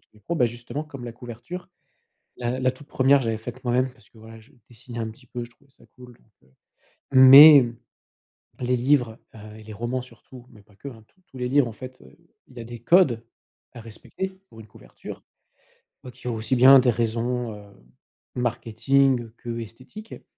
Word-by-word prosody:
tous - - -39
les 105 - -22
points, 170 +11 -4
bah 125 - +3
justement 120 +6 -7
comme 135 -5 -11
la 120 - -7
couverture. 120 +10 -10 0.7
La 125 +1 -3
la 130 0 +1
toute 145 - -17
1re 135 +1 +3
je 120 - -4
l'avais 110 -1 -2
faite 120 +3 -10
moi-même 125 +1 0
parce 115 -6 -25
que, 115 - -21
voilà, 110 0 -14
je 110 - -22 0.2
dessinais 120 0 -11
un 110 -1 -3
petit 125 +3 -18
peu, 120 0 -7
je 120 - -15
trouvais 135 +3 -29
ça 115 - -24
cool, 125 -1 -15
donc, 65 -12 -32
heu, - - -33 0.6
mais 135 +1 +9 0.9
les 125 0 0
livres, 120 -3 0 0.2
heu, 105 0 -12
et - - -13
les 110 0 -11
romans 120 +4 -4
surtout 125 -1 -16
mais 105 -4 -18
pas 100 -1 -26
que, 140 - -9
hein, 115 -5 -14
tous 185 - -35
tous 135 - -18
les 125 0 -3
livres 135 -2 +2
en - - -9
fait, 130 +3 -12
heu, 65 - -19 0.3
il 125 - -20
y - - -8
a - - -8
des 120 0 -10
codes 130 -6 +3 0.5
à 120 - -10
respecter 115 - -8 0.2
pour 115 - -15
une 110 - -13
couverture - - -13 0.8
donc 125 0 -13
il - - -7
y - - -1
a - - -2
aussi 110 +4 -2
bien 135 +2 +8
des 125 -1 +2
raisons, 115 +1 -3
heu, 105 - -12 0.7
marketing 125 +1 0
que 115 -1 -6
esthétiques 130 - -11
120 Hz, 210 wpm, -23 LUFS, 115-130 Hz, 0.9 s, mais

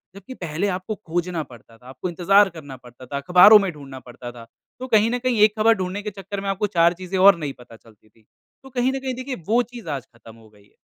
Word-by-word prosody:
जबकि 200 +6 -11
पहले 175 -2 -3
आपको 185 +3 -4
खोजना 175 -2 -4
पड़ता 115 -3 -17
था, 125 - -24
आपको 135 +7 -6
इंतज़ार 195 +4 +3
करना 145 -4 -10
पड़ता 125 +1 -15
था, 140 +3 -5
अख़बारों 180 +8 +7
में 195 -2 -2
ढूँढना 140 -4 -11
पड़ता 120 0 -11
था 120 -1 -13 0.3
तो 255 - -6
कहीं 220 -1 +3
न 245 - 0
कहीं 255 -1 -1
ये 210 - +7
ख़बर 225 +1 +4
ढूँढने 190 +1 -4
के 210 - -4
चक्कर 195 +1 -7
में 200 - -4
आपको 195 +2 -1
4 170 +1 +5
चीज़ें 185 +1 -5
और 195 0 +7
नई 150 -3 -4
पता 120 -1 -15
चलती 110 -1 -22
थीं। 110 +1 -29 0.4
तो 265 - -13
कहीं 255 0 0
न 270 - -3
कहीं 260 -1 -4
देखिए 255 +1 -5
वो 235 +3 +3
चीज़ 230 -9 -9
आज 135 -4 -4
ख़त्म 115 -1 -15
हो 110 -1 -19
गई 105 -1 -23
है। - - -32
180 Hz, 255 wpm, -22 LUFS, 130-210 Hz, 0.4 s, अख़बारों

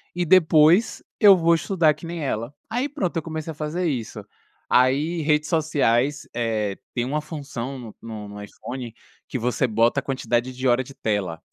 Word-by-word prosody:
e 175 0 0
depois 165 +2 +4 0.2
eu 200 -3 +8
vou 170 0 +4
estudar 165 -2 +2
que 170 - -12
nem 165 -2 -5
ela". 115 0 -3 0.2
Aí 250 +5 -1
pronto, 260 - -3
eu 165 - 0
comecei 160 0 -5
a - - -7
fazer 155 +4 -3
isso. 125 -8 -4 0.4
Aí, 145 +7 +2
redes 150 0 +1
sociais, 145 -4 +1
eh, 110 -4 -1 0.2
tem 120 -1 -1
uma 150 +4 -1
função 140 -4 -6
no 115 -4 -10
no 110 -2 -7
no 105 0 -8
iPhone 120 +3 -8 0.3
que - - -3
você 125 +2 0
bota 115 +4 +2
a - - -7
quantidade 125 -2 -1
de 130 +1 -2
hora 125 +1 +3
de 135 +2 -13
tela. 105 -9 -2
140 Hz, 180 wpm, -23 LUFS, 120-160 Hz, 0.4 s, eu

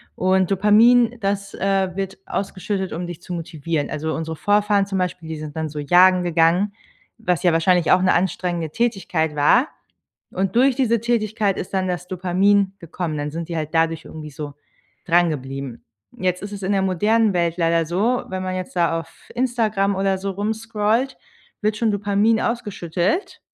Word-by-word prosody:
Und 185 0 +2
Dopamin, 225 +5 +5
das, 200 -1 -2
äh, 195 -2 0
wird 195 0 -3
ausgeschüttet, 195 0 -3
um 175 +2 -4
dich 175 -1 -8
zu 180 - -7
motivieren. 160 -2 -3
Also 155 +1 -3
unsere 160 -1 -4
Vorfahren 205 +1 +2
zum 195 -1 -3
Beispiel, 180 -2 -3
die 160 - -4
sind 150 0 -8
dann 160 0 -1
so 150 0 -6
jagen 180 +4 +5
gegangen, 175 +4 +2 0.4
was 180 -7 -1
ja 175 - +4
wahrscheinlich 165 +1 +3
auch 185 - +5
'ne 185 - +3
anstrengende 175 -3 -1
Tätigkeit 175 -7 -1
war, 240 - +4 0.7
und 190 +3 -1
durch 260 +1 +4
diese 235 -4 +2
Tätigkeit 220 -3 0
ist 185 - -6
dann 185 -1 0
das 180 0 -3
Dopamin 190 +2 +2
gekommen. 165 -2 -4
Dann 145 0 -3
sind 165 +1 -5
die 170 - -2
halt 155 -1 -3
dadurch 165 0 +1
irgendwie 155 -1 -9
so 145 0 -7 0.5
drangeblieben. 140 -7 -1 0.3
Jetzt 180 0 -1
ist 205 - -6
es 200 -1 -7
in 190 - -2
der 195 - +2
modernen 210 +4 +2
Welt 170 -1 0
leider 165 -1 +2
so, 210 +10 0
wenn 185 0 -3
man 185 0 -3
jetzt 185 0 -5
da 170 -1 +2
auf 165 0 -12
Instagram 220 -6 +1
oder 195 0 +1
so 195 +1 -3
rumscrollt, 220 +4 -1 0.4
wird 215 0 +1
schon 225 0 +1
Dopamin 205 +2 +2
ausgeschüttet, 205 - -2
185 Hz, 175 wpm, -21 LUFS, 165-205 Hz, 0.7 s, Dopamin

